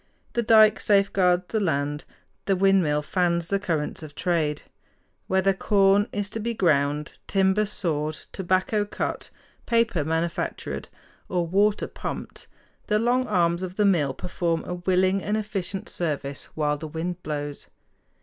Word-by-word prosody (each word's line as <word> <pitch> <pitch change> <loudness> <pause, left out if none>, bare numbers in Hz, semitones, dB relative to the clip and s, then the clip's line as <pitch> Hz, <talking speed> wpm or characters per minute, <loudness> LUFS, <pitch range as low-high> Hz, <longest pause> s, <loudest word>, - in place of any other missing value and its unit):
The 235 - +1
dike 220 -1 +6
safeguards 195 -3 +3
the 220 - 0
land; 145 -4 -1 0.4
the 195 - +2
windmill 185 -6 +3
fans 170 -1 0
the 200 - +1
currents 165 -7 -2
of 150 -2 -10
trade. 155 -5 0 0.6
Whether 190 +1 +2
corn 195 +1 +3
is 205 0 -2
to 225 - -4
be 230 +2 -2
ground, 150 -5 +1
timber 195 +2 +2
sawed, 155 -6 -2 0.2
tobacco 190 +3 0
cut, 205 - -4 0.4
paper 230 -9 +2
manufactured, 165 +2 -3 0.4
or 175 -2 0
water 200 +5 +2
pumped, - - -7 0.4
the 210 - +2
long 245 +3 +1
arms 170 -3 +2
of 185 -1 -5
the 210 - +3
mill 150 -9 +2
perform 170 -2 -2
a - - -4
willing 185 +2 +1
and 210 +2 -1
efficient 200 -3 -3
service 145 -4 -3
while 150 -1 0
the 155 - -6
wind 170 +3 -4
blows. 145 -2 -4
180 Hz, 140 wpm, -25 LUFS, 160-200 Hz, 0.6 s, dike